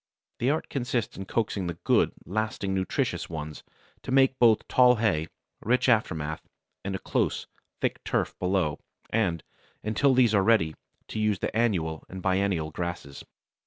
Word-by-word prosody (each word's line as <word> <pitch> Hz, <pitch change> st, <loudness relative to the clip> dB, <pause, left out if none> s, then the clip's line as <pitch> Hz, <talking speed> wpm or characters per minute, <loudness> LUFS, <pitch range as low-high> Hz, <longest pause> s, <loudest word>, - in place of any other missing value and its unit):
The 120 Hz, -, +2 dB
art 155 Hz, +2 st, 0 dB
consists 120 Hz, -4 st, -2 dB
in 95 Hz, -, -6 dB
coaxing 100 Hz, -3 st, -1 dB
the 85 Hz, -1 st, -4 dB
good, -, -, +3 dB
lasting, 105 Hz, -1 st, -2 dB
nutritious 95 Hz, -1 st, -1 dB
ones 80 Hz, -2 st, -6 dB, 0.4 s
to -, -, -6 dB
make 135 Hz, 0 st, +4 dB
both 115 Hz, -3 st, +4 dB
tall 125 Hz, -1 st, +6 dB
hay, 100 Hz, -9 st, +1 dB, 0.3 s
rich 125 Hz, +4 st, +2 dB
aftermath, 80 Hz, -10 st, +1 dB, 0.4 s
and 100 Hz, 0 st, -3 dB
a -, -, -1 dB
close, -, -, -1 dB, 0.4 s
thick -, -, -1 dB
turf -, -, 0 dB
below, 90 Hz, -5 st, 0 dB, 0.3 s
and, 90 Hz, -7 st, 0 dB, 0.4 s
until 130 Hz, +5 st, +2 dB
these 120 Hz, -4 st, +4 dB
are 100 Hz, -, +5 dB
ready, 95 Hz, -7 st, +3 dB, 0.4 s
to -, -, -4 dB
use 105 Hz, -2 st, +2 dB
the -, -, -3 dB
annual 90 Hz, -9 st, 0 dB
and 95 Hz, -1 st, -8 dB
biennial 95 Hz, -4 st, +1 dB
grasses. 85 Hz, -5 st, -5 dB
100 Hz, 155 wpm, -27 LUFS, 85-115 Hz, 0.4 s, tall